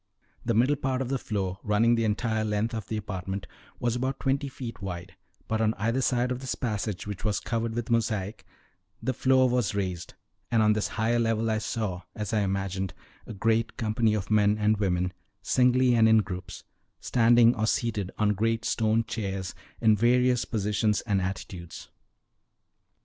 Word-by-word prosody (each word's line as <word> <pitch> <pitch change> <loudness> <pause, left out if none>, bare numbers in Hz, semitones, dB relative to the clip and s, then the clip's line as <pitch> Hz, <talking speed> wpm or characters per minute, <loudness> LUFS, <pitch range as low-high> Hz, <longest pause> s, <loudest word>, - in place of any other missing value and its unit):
The 115 -2 0
middle 130 +6 +3
part 130 -2 -1
of 125 - -6
the 135 -1 0
floor, 95 -4 -3
running 110 +3 +3
the 115 -1 +1
entire 110 +1 0
length 110 +2 -1
of 110 -3 -4
the 110 - -3
apartment, 95 -2 -4 0.3
was 120 -1 0
about 130 +2 -2
twenty 135 +1 0
feet 120 -5 -7
wide, 90 -3 -6 0.3
but 110 0 0
on 110 0 +2
either 115 +5 0
side 125 0 +1
of 125 - -2
this 130 -1 -3
passage, 105 -5 -3
which 105 -2 -6
was 105 -2 0
covered 115 -1 -2
with 120 0 -3
mosaic, 110 -3 -1 0.6
the 130 - -1
floor 130 +1 +4
was 120 -5 0
raised; 90 -3 -3 0.3
and 115 -2 +3
on 105 0 +5
this 105 0 0
higher 115 +2 +2
level 115 -1 +1
I 110 - +1
saw, 105 -5 -3
as 105 0 -4
I 110 - +3
imagined, 95 -1 -2 0.3
a - - -6
great 115 +2 0
company 110 0 +1
of 105 0 -4
men 105 0 +4
and 105 0 +3
women, 90 -2 0 0.3
singly 125 0 +3
and 110 -1 +5
in 110 -1 +5
groups, 90 -2 -7 0.4
standing 120 0 +5
or 110 -1 0
seated 110 -5 -1
on 105 -1 +2
great 115 +2 0
stone 110 0 +2
chairs 95 -5 -4 0.3
in 110 -1 +5
various 125 +2 +3
positions 105 -1 0
and 100 -4 0
attitudes. 90 -2 -6
110 Hz, 175 wpm, -27 LUFS, 100-120 Hz, 0.6 s, on